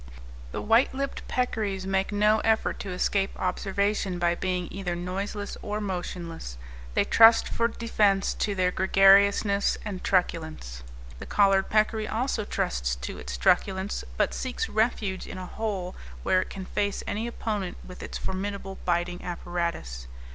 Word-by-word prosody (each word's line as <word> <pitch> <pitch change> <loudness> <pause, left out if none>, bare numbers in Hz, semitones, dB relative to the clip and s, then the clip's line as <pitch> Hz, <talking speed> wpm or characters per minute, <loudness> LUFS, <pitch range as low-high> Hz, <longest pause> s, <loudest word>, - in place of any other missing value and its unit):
The - - -4
white 230 +5 +4
lipped 275 +1 -4
peccaries 210 -6 -1
make 195 +1 0
no 210 +1 +4
effort 220 0 +1
to 200 - -5
escape 195 +2 0
observation 195 +1 0
by 175 0 +2
being 180 0 -2
either 185 -2 -3
noiseless 195 +4 -4
or 210 0 -3
motionless; 175 - -5 0.4
they - - +4
trust 225 0 +7
for 230 - +1
defence 210 -4 +1
to 205 - -1
their 180 -1 +2
gregariousness 200 +2 +4
and 195 -3 -5
truculence. 160 - -1 0.4
The - - -8
collared 195 -1 +3
peccary 215 0 +2
also 225 -1 -1
trusts - - -1
to 60 +1 -6
its 60 -1 -5
truculence, 190 - +1
but - - +2
seeks 265 - -2
refuge 215 - 0
in - - -7
a 185 - -5
hole 190 -3 -4 0.3
where 185 - +3
it - - -6
can 190 -1 -6
face 200 +1 -1
any 220 +3 -2
opponent 210 -6 -3
with 180 - -10
its - - -5
formidable 195 0 -4
biting 175 0 0
apparatus. 170 - -4
195 Hz, 145 wpm, -27 LUFS, 180-210 Hz, 0.4 s, trust